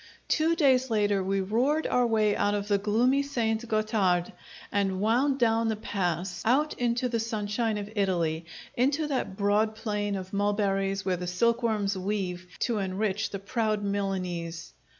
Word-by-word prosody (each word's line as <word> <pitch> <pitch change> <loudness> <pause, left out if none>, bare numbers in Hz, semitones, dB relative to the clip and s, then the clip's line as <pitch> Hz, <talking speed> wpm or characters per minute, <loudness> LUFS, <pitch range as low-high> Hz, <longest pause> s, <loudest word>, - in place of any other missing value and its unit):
Two 325 +1 +2
days 265 -5 +3
later 205 -3 +1
we 195 +1 0
roared 250 +11 +1
our 250 -1 +2
way 215 -2 +2
out 205 0 +1
of 205 0 -3
the 200 -1 +2
gloomy 235 +7 +2
St. 235 -5 -1
Gotthard 215 -5 +1 0.4
and 195 -2 0
wound 250 +7 +2
down 230 -2 +2
the 220 - 0
pass, 180 -4 -2
out 285 +7 +2
into 240 +1 +1
the 230 -2 -1
sunshine 220 0 -1
of 205 -1 -4
Italy, 170 -5 0 0.3
into 280 +5 +1
that 260 -9 -2
broad 210 +2 +2
plain 210 -2 -2
of 190 0 -6
mulberries 200 -1 0
where 185 -2 +1
the 180 0 -5
silkworms 220 +1 +1
weave 185 -2 -3
to 235 -4 0
enrich 195 +2 -1
the 200 - -4
proud 215 +1 -1
Milanese. 185 -4 -3
210 Hz, 155 wpm, -28 LUFS, 195-230 Hz, 0.4 s, days